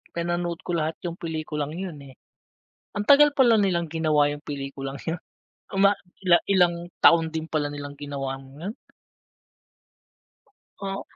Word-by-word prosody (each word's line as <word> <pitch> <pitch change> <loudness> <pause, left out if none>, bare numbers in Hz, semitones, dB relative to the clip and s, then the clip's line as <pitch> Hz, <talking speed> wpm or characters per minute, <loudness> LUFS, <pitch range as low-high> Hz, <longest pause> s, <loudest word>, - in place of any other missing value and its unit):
Pinanood 175 0 -2
ko - - -4
lahat 160 -1 0
yung 170 0 -5
pelikulang 155 -3 -4
yun, 180 -4 -5
eh. 135 -2 -13 0.8
Ang 205 - -1
tagal 290 +3 +6
pala 240 -5 +5
nilang 170 -5 +1
ginawa 155 -3 +2
yung 145 0 -7
pelikulang 135 -1 -5
yun. 165 +1 -3 0.6
Uma 200 +1 +6 0.3
ila 175 -2 +6
ilang 175 -3 +3 0.2
taon 165 -1 +7
din 160 0 -3
pala 150 -2 0
nilang 145 0 -7
ginawa 135 -2 -4
yun. 145 - -8 2.1
Oh. 195 0 -3
165 Hz, 135 wpm, -25 LUFS, 145-180 Hz, 2.1 s, taon